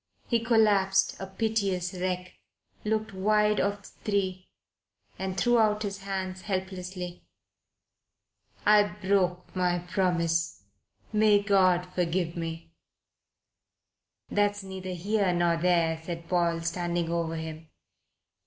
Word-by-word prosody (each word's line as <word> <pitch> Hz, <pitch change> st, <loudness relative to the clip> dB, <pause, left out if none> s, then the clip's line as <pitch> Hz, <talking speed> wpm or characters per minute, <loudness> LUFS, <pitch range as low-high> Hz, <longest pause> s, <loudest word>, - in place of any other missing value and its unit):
He 235 Hz, -, +2 dB
collapsed, 205 Hz, -4 st, +3 dB
a 195 Hz, -, -5 dB
piteous 195 Hz, -3 st, -1 dB
wreck, 180 Hz, 0 st, -3 dB, 0.5 s
looked 220 Hz, 0 st, -1 dB
wide 210 Hz, +2 st, +2 dB
of 200 Hz, 0 st, -1 dB
the -, -, -11 dB, 0.2 s
three, 190 Hz, -3 st, -1 dB, 0.7 s
and 190 Hz, 0 st, -3 dB
threw 240 Hz, +6 st, +3 dB
out 215 Hz, -1 st, +2 dB
his 195 Hz, -1 st, -4 dB
hands 190 Hz, -1 st, -4 dB
helplessly. 185 Hz, -2 st, -5 dB, 1.4 s
"I 210 Hz, 0 st, +7 dB
broke 190 Hz, -2 st, 0 dB
my 180 Hz, -1 st, +2 dB
promise. 170 Hz, -, 0 dB, 0.5 s
May 210 Hz, -1 st, +5 dB
God 185 Hz, -3 st, +4 dB
forgive 175 Hz, -1 st, 0 dB
me!" 165 Hz, 0 st, -5 dB, 1.6 s
"That's 205 Hz, 0 st, +1 dB
neither 190 Hz, -1 st, -7 dB
here 195 Hz, +1 st, +1 dB
nor 175 Hz, -1 st, +2 dB
there," 165 Hz, -2 st, +2 dB
said 170 Hz, 0 st, -6 dB
Paul, 170 Hz, -2 st, +1 dB
standing 170 Hz, 0 st, -1 dB
over 165 Hz, -1 st, -1 dB
him. 160 Hz, 0 st, -7 dB
185 Hz, 110 wpm, -28 LUFS, 175-200 Hz, 1.6 s, I